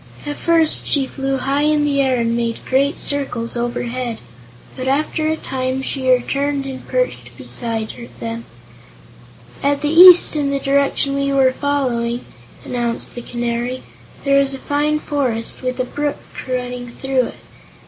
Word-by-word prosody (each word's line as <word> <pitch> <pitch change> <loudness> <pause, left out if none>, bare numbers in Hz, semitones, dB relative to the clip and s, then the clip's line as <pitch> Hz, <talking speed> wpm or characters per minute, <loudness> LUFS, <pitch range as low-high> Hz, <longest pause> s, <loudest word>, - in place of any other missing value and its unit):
At 290 0 -3
first 330 -2 +2
she 280 -2 +1
flew 270 0 -2
high 275 +2 0
in 300 0 +2
the 280 -1 +2
air 265 -1 +2
and 230 0 0
made 230 -1 -2
great 275 +2 +1
circles 250 -5 0
overhead, 240 0 -3 0.6
but 260 0 -5
after 305 +3 0
a 315 - 0
time 260 -1 -3
she 265 -1 -2
returned 275 +3 0
and 265 -1 -7
perched - - -2
beside 230 0 -4
them. 230 0 -5 1.2
"At 285 0 +1
the 295 0 0
east 355 0 +9
in 290 -2 0
the 280 - 0
direction 275 0 +1
we 275 0 0
were 265 -2 +3
following," 250 -4 -1 0.4
announced 240 -2 -2
the 240 - -6
Canary, 240 +1 -3 0.4
"there 275 0 +4
is 275 0 +1
a - - -6
fine 295 +2 0
forest, 255 -7 +1
with 255 0 -3
a - - +2
brook 290 +3 -3 0.3
running 250 -1 -3
through 260 0 -1
it. - - -10
270 Hz, 155 wpm, -19 LUFS, 245-285 Hz, 1.2 s, east